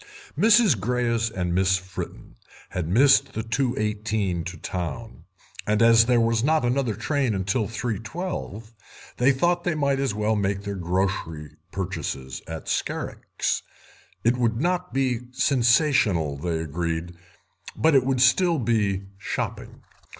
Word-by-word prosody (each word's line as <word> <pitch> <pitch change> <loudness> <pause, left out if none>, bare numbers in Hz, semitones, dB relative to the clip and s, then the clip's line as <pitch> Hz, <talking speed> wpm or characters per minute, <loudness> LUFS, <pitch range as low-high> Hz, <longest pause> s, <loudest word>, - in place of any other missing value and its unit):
Mrs. 215 - +5
Greyes 115 0 0
and 90 -5 -2
Miss 95 0 +3
Fritten 90 0 -8 0.3
had 90 -3 -3
missed 135 +7 +4
the 110 - -3
2.18 110 -6 -1
to 90 -1 -6
Town, 95 +8 -6 0.4
and 105 0 +2
as 115 0 +6
there 125 -1 +4
was 115 0 +2
not 155 -2 +2
another 120 -3 0
train 115 -4 -1
till 105 +3 0
3.12 115 - -5 0.5
they 125 +3 +4
thought 175 +6 +1
that - - 0
they 165 - -1
might 140 -2 +1
as 135 -7 -1
well 105 +1 +1
make 100 -1 -1
their 100 0 -4
grocery 90 -4 -2 0.2
purchases 65 -1 -4
at 80 -1 -7
Scarrick's. - - -2 0.6
It 120 +2 +2
would 115 -2 0
not 180 +3 -1
be 130 -3 0
sensational, 120 - +2
they 80 +3 -2
agreed, 85 +2 -3 0.6
but 160 0 +3
it 135 -3 +5
would 130 -1 0
still 170 +6 +4
be 105 -6 0 0.2
shopping. - - -5
115 Hz, 135 wpm, -24 LUFS, 95-130 Hz, 0.6 s, as